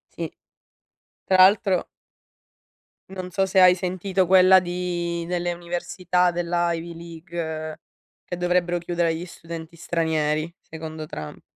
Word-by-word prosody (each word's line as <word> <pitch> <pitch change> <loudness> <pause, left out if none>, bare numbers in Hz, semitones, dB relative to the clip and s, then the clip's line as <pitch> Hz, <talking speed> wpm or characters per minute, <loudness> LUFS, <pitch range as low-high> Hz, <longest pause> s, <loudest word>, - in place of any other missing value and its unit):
Sì. - - -4 0.9
Tra 190 - +2
l'altro 190 -1 +5 1.2
non 185 -1 -6
so 195 +2 +1
se 190 0 +2
hai 180 -1 +8
sentito 185 +1 -1
quella 185 +1 +7
di 175 -1 -3
delle 175 0 -1
università 175 +1 0
dell'Ivy 170 -1 -1
League, 165 -2 -6 0.4
che 175 - -5
dovrebbero 175 0 +1
chiudere 175 0 0
agli 165 +2 -3
studenti 165 -1 -9
stranieri, 160 -1 -1
secondo 160 -1 -7
Trump. 75 - -8
175 Hz, 115 wpm, -24 LUFS, 165-180 Hz, 1.2 s, hai